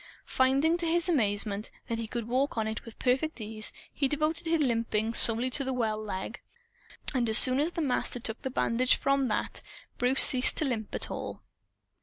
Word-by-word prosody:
Finding, 275 +6 +1
to 340 -1 -3
his 345 +2 0
amaze, 215 - 0
that 210 0 -5 0.3
he 225 - -5
could 235 0 -6
walk 260 +3 -2
on 220 -1 -1
it 220 0 -5
with 230 - -13
perfect 265 +4 -1
ease, 215 0 -3 0.2
he 275 - -1
devoted 310 +4 -3
his 330 0 0
limping 230 -4 -1
solely 235 +3 +2
to 275 - 0
the 265 0 -4
well 220 -3 -2
leg. 210 +3 -7 0.7
And 245 -4 -1
as 220 - +5
soon 255 +1 +5
as 320 +4 -1
the 330 - -3
Master 250 -2 0
took 225 -1 -5
the 265 - -4
bandage 250 0 +1
from 275 -1 0
that, 215 - -3 0.4
Bruce 255 +2 +5
ceased 255 -1 +8
to 310 - -2
limp 225 -6 -4
at - - +2
all. - - -7
250 Hz, 195 wpm, -27 LUFS, 220-280 Hz, 0.7 s, ceased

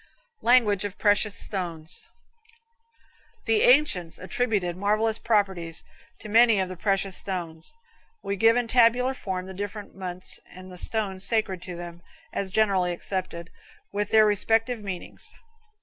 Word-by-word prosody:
LANGUAGE 230 -5 +4
OF 205 -1 -5
PRECIOUS 205 0 +2
STONES. 170 -5 -6 1.4
The 225 -2 +2
ancients 245 - +3
attributed 195 -3 -1
marvelous 215 +3 0
properties 190 -7 0 0.4
to - - -8
many 225 0 +5
of 185 -1 -1
the 185 - -6
precious 195 0 0
stones. 170 -4 -4 0.5
We 200 - -2
give 225 +4 +4
in 245 -1 0
tabular 245 +2 +4
form 190 -7 -4
the 190 - -8
different 205 +2 -6
months 185 -1 -5
and 185 0 -11
the 180 - -9
stones 195 -3 +4
sacred 210 -6 0
to 180 -1 -7
them, 170 0 -8 0.3
as 195 - -2
generally 190 -3 +2
accepted, 175 -2 -5 0.4
with 205 0 -2
their 220 -1 +6
respective 225 +3 +1
meanings. 195 -4 -6
200 Hz, 135 wpm, -26 LUFS, 185-220 Hz, 1.4 s, their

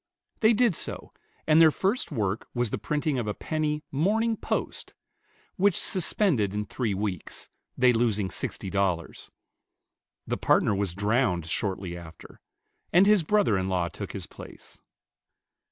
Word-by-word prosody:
They 220 +1 +5
did 230 -4 +3
so, - - -5 0.3
and 155 +1 +5
their 160 - +8
first 195 +9 -1
work 105 -5 -2
was 120 -3 0
the - - -2
printing 145 +4 -1
of 115 - -3
a 105 - -2
penny 155 -1 -2
"Morning 220 +10 +1
Post," - - -4 0.6
which 200 -1 +3
suspended 155 - +1
in 105 0 -2
three 110 -2 -2
weeks, 95 -3 -4 0.3
they 125 -1 +5
losing 110 -5 +1
sixty 95 - -3
dollars. 95 -4 -2 1.0
The - - -2
partner - - +3
was 100 -3 -1
drowned 100 -4 +1
shortly 95 0 -3
after, 85 -2 -12 0.5
and 180 +3 +6
his 210 -2 +5
brother 175 - +2
in 95 0 -2
law 90 -2 0
took - - -7
his - - -5
place. - - -13
115 Hz, 145 wpm, -27 LUFS, -, 1.0 s, their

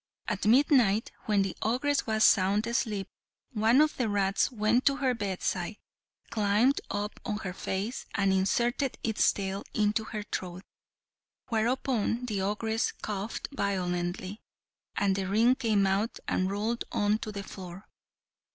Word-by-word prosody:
At 210 -1 -1
midnight, 235 -4 +4 0.2
when 205 -2 +3
the 195 - -3
ogress 260 +6 +1
was 220 0 +2
sound 200 +2 +4
asleep, 220 -4 -1 0.4
one 225 +2 +3
of 305 0 +2
the 245 -4 0
rats 200 +3 +1
went 230 +2 +2
to 275 - +4
her 270 -3 +1
bedside, 195 -2 -2 0.6
climbed 215 +6 +2
up 205 +1 -3
on 210 -3 -2
her 180 - -3
face, 195 +6 -4
and 195 -1 +2
inserted 240 +7 +1
its 220 -2 +3
tail 195 0 -4
into 215 +1 +1
her 215 -2 -5
throat; 185 -2 -5 0.9
whereupon 240 0 0
the 210 -5 -2
ogress 220 +3 0
coughed 210 +1 -5
violently, 185 -2 -2 0.5
and 200 -1 +2
the 190 -1 -2
ring 225 +6 +4
came 220 -6 +1
out 195 +4 0
and 185 0 +1
rolled 215 +4 -1
on 210 +1 +1
to 215 - -5
the 200 -1 -5
floor. 185 0 -10
210 Hz, 140 wpm, -29 LUFS, 195-230 Hz, 0.9 s, midnight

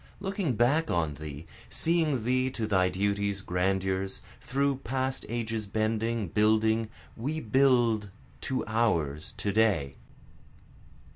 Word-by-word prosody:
Looking 195 - -1
back 145 +8 +2
on 80 -3 0
thee, 75 +1 -8 0.2
seeing 160 -7 +1
thee 130 +2 +1
to 115 -4 -3
thy 95 -3 +2
duties, 100 +1 -1
grandeurs, 95 +1 -1 0.2
through 140 +1 0
past 130 0 -2
ages 115 -2 -2
bending, 110 0 -1
building, 110 +3 +2 0.3
We 145 +7 -3
build 120 -5 +3 0.3
to 130 - -2
ours 85 -10 0
to 100 - -1
day. 95 -11 +2
110 Hz, 115 wpm, -29 LUFS, 95-130 Hz, 0.3 s, build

